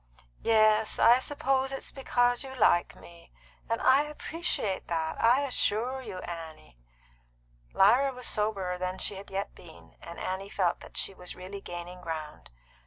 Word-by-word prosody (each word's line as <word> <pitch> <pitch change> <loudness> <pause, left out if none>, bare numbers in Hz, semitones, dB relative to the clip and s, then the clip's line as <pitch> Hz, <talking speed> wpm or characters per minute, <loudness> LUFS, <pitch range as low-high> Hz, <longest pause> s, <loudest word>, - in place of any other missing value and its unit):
"Yes, 215 -1 +4
I 240 +2 +6
suppose 270 -1 0
it's 270 - -6
because 245 -2 +1
you 265 -1 -8
like 175 -7 +3
me; 170 0 -16 0.4
and 230 - 0
I 265 +2 +6
appreciate 300 - -3
that, 160 -1 -2
I 245 +4 +5
assure 255 -1 0
you, 190 - -7
Annie." 160 - -9 0.9
Lyra 250 +8 +5
was 250 -1 -7
soberer 195 -4 -1
than 185 +1 -2
she 205 - -1
had 195 - -10
yet 195 +1 -3
been, 165 -2 -16
and 170 - -9
Annie 190 +2 -4
felt 185 -4 0
that - - -12
she - - 0
was 180 -1 -8
really 190 +2 -8
gaining 175 0 -8
ground. 160 -3 -6
205 Hz, 155 wpm, -29 LUFS, 180-255 Hz, 0.9 s, I